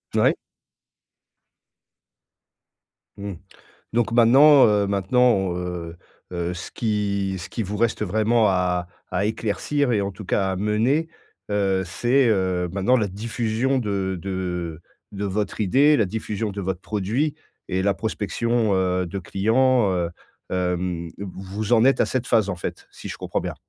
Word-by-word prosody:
Ouais. - - +4 2.8
Mmh, 100 0 -5 0.6
donc 115 -1 +1
maintenant, 130 +4 +7
heu, 105 -1 +2
maintenant, 100 -1 +2
heu, 90 -2 -5 0.3
heu, 85 0 -2
ce 90 - -7
qui 100 -3 -1
ce 85 - -8
qui 115 - -3
vous 105 +1 -4
reste 115 -1 +1
vraiment 110 +3 +2
à 90 -2 0 0.2
à 90 +2 0
éclaircir 115 +6 -1
et 105 -3 +2
en 100 0 -2
tout 95 +2 -10
cas 95 0 +1
à 95 - -2
mener, 110 - +1 0.4
heu, 95 -2 +1
c'est, 120 +8 +2
heu, 95 -4 +1
maintenant, 100 +7 +2
la 105 -3 0
diffusion 115 +5 -1
de 100 -4 -2
de 90 -4 -4 0.3
de 100 +1 -3
votre 100 +2 -2
idée, 140 +9 +4
la 110 - +3
diffusion 105 +1 -3
de 100 0 -5
votre 95 -1 -3
produit, 110 +9 -1 0.4
et 95 0 0
la 100 0 +2
prospection, 110 0 -1
heu, 90 -1 +1
de 100 +4 -5
clients, 110 +4 +2
heu, 85 -2 -1 0.4
hem, 90 -2 -1
vous 100 +3 -4
en 115 +1 +5
êtes 135 - +4
à - - +3
cette 125 -2 -2
phase, 110 -4 +3
en 90 - -2
fait, 85 - -6
si - - -10
je - - -6
comprends - - -3
bien? - - -5
100 Hz, 150 wpm, -23 LUFS, 95-115 Hz, 2.8 s, maintenant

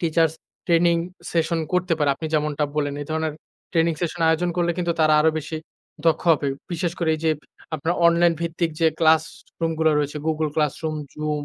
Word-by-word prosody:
Teachers 165 -2 +2 0.3
training 170 0 +4 0.4
session 165 0 +1
করতে 180 -1 +1
পারে। 150 - +2
আপনি 160 +4 -5
যেমনটা 150 -1 +1
বললেন 145 -2 0
এ - - -7
ধরনের 160 -1 -1 0.4
ট্রেনিং 165 0 +3
সেশন 175 0 -3
আয়োজন 170 +2 +2
করলে 175 -1 +2
কিন্তু 175 -1 +1
তারা 155 -1 +5
আরো 160 +1 +4
বেশি 155 +1 -5 0.5
দক্ষ 165 - +3
হবে। 145 -2 0 0.2
বিশেষ 170 0 -1
করে 170 - 0
এই - - -11
যে 160 - +4 0.5
আপনার 160 +4 -1
অনলাইন 170 0 +4
ভিত্তিক 170 0 -1
যে 165 - +5
ক্লাসরুম 160 0 +1
গুলো 160 0 +4
রয়েছে 145 +1 -2
Google 155 -1 0
Classroom, 155 +1 -1 0.2
Zoom, 150 -1 -2
160 Hz, 180 wpm, -23 LUFS, 155-170 Hz, 0.5 s, তারা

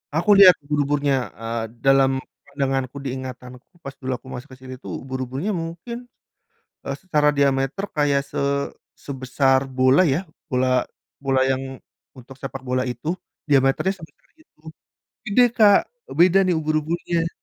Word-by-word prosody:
Aku 175 +6 +2
lihat 185 -2 +10
ubur-uburnya, 145 -1 +1 0.2
eee, 115 0 -4 0.2
dalam 135 0 +5 0.4
pandanganku, 135 -2 -2
di 135 - -3
ingatanku 125 -1 -8 0.2
pas 135 - -6
dulu 130 -1 -4
aku 130 - -13
masuk 125 +4 -8
ke - - -21
sini 130 0 -8
tuh - - -7
ubur-uburnya 130 - -3
mungkin, 170 +7 -5 0.9
eee, 140 - -3
secara 150 -5 +2
diameter 140 +5 +1
kayak 145 -2 +2
se - - -5 0.5
sebesar 135 0 0 0.2
bola 130 +7 +5
ya, 150 +2 +2 0.3
bola 130 0 +2 0.4
bola 135 -1 +2
yang 135 0 -3 0.3
untuk 130 0 -14
sepak 135 -1 -7
bola 130 0 0
itu, 125 +4 -5 0.4
diameternya 140 +7 +3
sebesar - - -22
itu. 315 - -27 0.7
Gede, 245 +4 +4
Kak, 205 -3 +7 0.3
eee, - - -7
beda 185 +2 +6
nih 180 -2 +1
ubur-uburnya. 165 +2 -1
135 Hz, 140 wpm, -22 LUFS, 130-165 Hz, 0.9 s, lihat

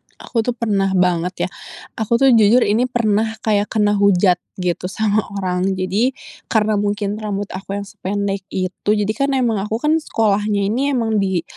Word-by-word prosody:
Aku 235 - -4
tuh 235 +2 -1
pernah 205 -5 0
banget 180 -1 +1
ya, - - -15 0.5
aku 220 +2 +1
tuh 270 +2 +5
jujur 230 +1 +5
ini 225 +5 +2
pernah 220 -2 0
kayak 210 -2 +1
kena 210 -2 +1
hujat 185 -3 +4 0.2
gitu 180 -1 -2
sama 210 +2 0 0.2
orang. 185 0 -1
Jadi 200 +8 0 0.3
karena 215 -2 +1
mungkin 205 0 -2
rambut 205 -2 -4
aku 195 +1 -6
yang 200 - -3
sependek 200 0 -3
itu 185 +2 -4
jadikan 220 +7 0
emang 235 -5 +1
aku 215 - -2
kan 300 +7 +1
sekolahnya 210 -6 0
ini 275 +4 0
emang 225 -3 +1
di 190 -4 0
205 Hz, 165 wpm, -19 LUFS, 195-225 Hz, 0.5 s, tuh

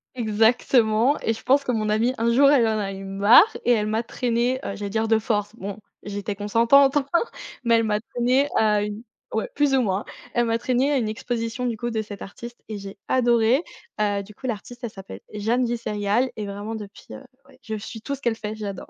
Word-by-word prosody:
Exactement, 225 +2 +3
et 225 - 0
je 225 - -10
pense 275 +2 +3
que 255 - -1
mon 215 -3 -1
amie 220 +4 +2
un 230 +1 +1
jour 275 +3 +6
elle 250 -6 +4
en 220 -1 0
a 200 -2 -2
eu 195 0 -8
marre 205 - +5
et 245 - +3
elle 215 -3 +2
m'a 220 +2 0
traînée, 240 +2 0
heu, - - -3
j'allais 200 0 -5
dire 220 +2 0
de 225 0 +4
force. 210 -1 -2
Bon, 200 -1 -6 0.2
j'étais 205 0 -4
consentante 235 +7 +4
enfin, 280 -1 0 0.6
mais 235 -1 +4
elle 230 0 +2
m'a 210 -1 0
traînée 250 +5 +1
à 210 -1 +3
une 210 +2 -5 0.3
ouais, - - -1
plus 290 -2 +2
ou 265 - +4
moins. 195 -3 -1 0.3
Elle 240 - +2
m'a 230 0 +1
traînée 255 +4 +1
à 285 - +2
une 235 -4 0
exposition 230 +2 -3
du 235 -2 -2
coup 240 +2 -3
de 220 -1 -1
cette 205 -2 -9
artiste 235 +4 -9
et 215 - -5
j'ai 195 0 -9
adoré, 240 +2 +3 0.4
heu, 205 -1 +1
du 205 +1 -13
coup 260 - -7
l'artiste 240 +2 -6
elle 235 - -2
s'appelle 190 - -10
Jeanne 225 +4 0
Visserial 230 0 0
et 210 - -4
vraiment 205 +2 -5
depuis, 210 -2 -10
heu, - - -9 0.2
ouais, - - -20
je 220 -2 -4
suis 220 +1 -8
tout 280 - -4
ce 275 - -6
qu'elle 235 -4 0
fait, 215 -1 -5
j'adore. 200 -3 -6
225 Hz, 225 wpm, -24 LUFS, 210-245 Hz, 0.6 s, jour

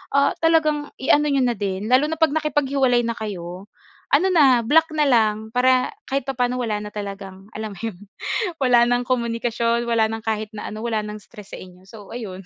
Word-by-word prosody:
ah, 280 0 +4
talagang 310 -3 +2
i-ano 295 +3 +3
niyo 275 -3 +2
na 245 - +2
din. 200 +2 -3
Lalo 265 +4 +4
na 320 - -2
pag 320 -3 +3
nakipaghiwalay 275 -5 +1
na 230 - -1
kayo, 185 -2 -6 0.5
ano 360 +6 +3
na, 265 -8 +5
block 320 +7 +3
na 300 - +3
lang, 220 -3 +1
para 255 - +3 0.2
kahit 275 -1 -1
papaano 250 -2 -1
wala 215 -3 -1
na 210 - -8
talagang, 195 -1 -7
alam 215 -1 -5
mo - - -13
'yon, 220 -6 -4 0.6
wala 240 -2 +5
ng 245 0 +1
komunikasyon, 235 -1 -1
wala 225 -1 +3
ng 225 0 -5
kahit 215 -1 -2
na 210 - -6
ano, 215 +1 -7
wala 220 -2 -1
ng 210 0 -7
stress 210 -4 -14
sa - - -10
inyo. 180 0 -14
So 210 -2 -13
ayun, 195 -6 -7
235 Hz, 200 wpm, -22 LUFS, 210-270 Hz, 0.6 s, na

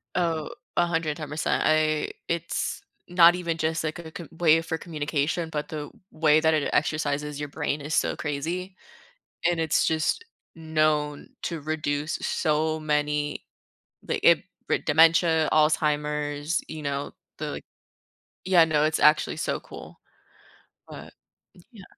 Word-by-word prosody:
Oh, 165 -4 0 0.3
110%. 160 -3 0
I 155 0 +2 0.2
it's 170 0 -2 0.3
not 175 -1 +7
even 170 -2 -2
just, 160 0 -1
like, 155 - -2 0.2
co 170 - -6
a - - -19
way 165 -1 +4
for 165 0 -3
communication, 155 0 -2
but 150 -2 -4
the 150 -2 -5 0.2
way 155 -1 +3
that 160 0 +3
it 155 -2 +1
exercises 150 -1 -1
your 145 - -3
brain 150 0 -2
is 150 +2 -3
so - - +1
crazy, 170 +6 -4 0.8
and 170 -1 -1
it's 160 -1 +2
just 160 - 0 0.3
known 155 -2 0
to 165 -2 -3
reduce 150 0 -2
so 155 0 0
many, 150 -1 -1 0.6
like, - - -1
it - - +5 0.2
for - - +2
dementia, 160 +1 +4
Alzheimer's, 150 0 +1
you 160 - -6
know, 140 -1 -3 0.3
the, - - -3
like - - -7 0.8
Yeah, 180 -3 +6
no, 155 -2 +2
it's 155 0 +1
actually 150 0 +4
so - - -2
cool, - - -12 0.9
but, - - -11 0.6
yeah 215 -5 -13
155 Hz, 135 wpm, -26 LUFS, 150-165 Hz, 0.9 s, not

